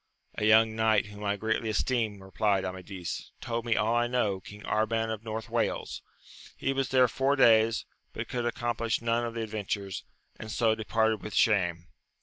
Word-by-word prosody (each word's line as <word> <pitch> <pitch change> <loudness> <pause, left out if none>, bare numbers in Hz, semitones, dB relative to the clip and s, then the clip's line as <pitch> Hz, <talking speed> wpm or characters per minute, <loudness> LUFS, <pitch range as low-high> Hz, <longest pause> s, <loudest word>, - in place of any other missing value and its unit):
A 105 - -2
young 110 +1 +5
knight 110 -1 +3
whom 105 0 -10
I 100 0 +1
greatly 110 +1 -1
esteem, 110 -2 -1
replied 95 0 0
Amadis, 95 -1 -6
told 115 -1 -3
me 115 - +3
all 105 +3 +1
I 120 0 +2
know; 110 -6 0
King 105 +2 -12
Arban 110 +1 0
of 110 0 -8
North 110 -1 -5
Wales: - - -2 0.6
he 135 - 0
was 135 -2 -1
there 130 -1 +5
four 135 +4 +1
days, 115 -3 +4 0.3
but - - -5
could 120 -1 -2
accomplish 120 -1 -1
none 115 0 0
of 115 -1 -4
the 115 - -2
adventures, 100 -3 -4 0.4
and 110 - -7
so 115 0 +2
departed 110 0 0
with 105 - -6
shame. 85 -7 +2
110 Hz, 175 wpm, -29 LUFS, 105-115 Hz, 0.6 s, young